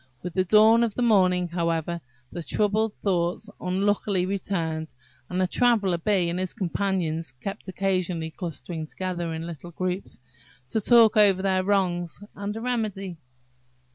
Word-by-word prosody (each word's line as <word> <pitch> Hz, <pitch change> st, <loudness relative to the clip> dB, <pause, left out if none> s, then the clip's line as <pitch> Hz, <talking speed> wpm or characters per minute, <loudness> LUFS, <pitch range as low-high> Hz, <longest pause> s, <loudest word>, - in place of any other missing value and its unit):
With 180 Hz, -1 st, -5 dB
the 185 Hz, -, +2 dB
dawn 220 Hz, +4 st, +6 dB
of 225 Hz, -3 st, -1 dB
the 245 Hz, -, 0 dB
morning, 185 Hz, -5 st, +4 dB
however, 170 Hz, 0 st, -1 dB, 0.3 s
the 175 Hz, -, -5 dB
troubled 210 Hz, +5 st, 0 dB
thoughts 185 Hz, +2 st, 0 dB
unluckily 190 Hz, 0 st, 0 dB
returned, 165 Hz, -5 st, -2 dB, 0.4 s
and 180 Hz, -, -2 dB
the 185 Hz, -, +3 dB
Traveller 200 Hz, -4 st, +2 dB
bee 185 Hz, -1 st, +1 dB
and 170 Hz, +2 st, -2 dB
his 185 Hz, -1 st, -3 dB
companions 175 Hz, -3 st, -1 dB
kept 195 Hz, +11 st, -6 dB
occasionally 185 Hz, -4 st, -1 dB
clustering 160 Hz, -2 st, -6 dB
together 175 Hz, -1 st, -3 dB
in 160 Hz, 0 st, -4 dB
little 170 Hz, 0 st, -8 dB
groups, 185 Hz, 0 st, -4 dB, 0.5 s
to 220 Hz, -, 0 dB
talk 225 Hz, 0 st, +6 dB
over 195 Hz, -3 st, +5 dB
their 190 Hz, -1 st, +2 dB
wrongs 180 Hz, -4 st, 0 dB
and 205 Hz, +1 st, -5 dB
a 225 Hz, -, -5 dB
remedy. 210 Hz, -7 st, -2 dB
185 Hz, 145 wpm, -26 LUFS, 170-205 Hz, 0.5 s, dawn